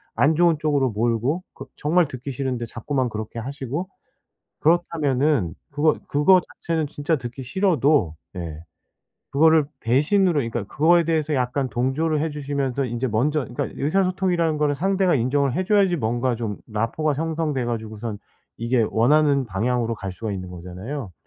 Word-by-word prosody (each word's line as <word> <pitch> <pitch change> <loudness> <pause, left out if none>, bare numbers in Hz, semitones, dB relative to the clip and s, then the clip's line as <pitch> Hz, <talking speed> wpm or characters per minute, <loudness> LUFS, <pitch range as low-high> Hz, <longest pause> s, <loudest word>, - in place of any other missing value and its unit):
안 150 +2 +3
좋은 170 -2 +4
쪽으로 140 -4 +1
몰고 120 - 0
그 135 - -9
정말 165 +2 +2
듣기 130 +2 -6
싫은데 125 -2 -2
자꾸만 130 +3 -2
그렇게 110 +1 -5
하시고 140 +7 -4 0.7
그렇다면은 150 - +1 0.2
그거 150 +1 +2
그거 180 +6 +5
자체는 160 -3 -3
진짜 145 +2 -1
듣기 125 0 -7
싫어도 145 - +2 0.2
네. 80 -3 -6 0.7
그거를 160 +1 +4
배신으로 155 - +3
그러니까 120 -5 -1
그거에 170 - +3
대해서 155 -2 0
약간 130 +1 0
동조를 145 +6 0
해 160 - -1
주시면서 140 -2 -2
인제 120 +2 -2
먼저 145 +8 +1
그러니까 120 - -3
의사소통이라는 180 -1 +1
거는 145 -1 +2
상대가 190 +2 +2
인정을 135 +2 +1
해 185 - 0
줘야지 195 -3 +3
뭔가 120 0 0
좀 110 -3 -4
라포가 115 +8 -1
형성돼 155 -3 -1
가지고선 110 -2 -4 0.4
이게 115 -1 +1
원하는 140 +4 +3
방향으로 115 +3 0
갈 95 -2 -5
수가 110 +1 -5
있는 90 -2 -5
거잖아요. 90 +6 -7
140 Hz, 365 characters per minute, -23 LUFS, 120-155 Hz, 0.7 s, 그거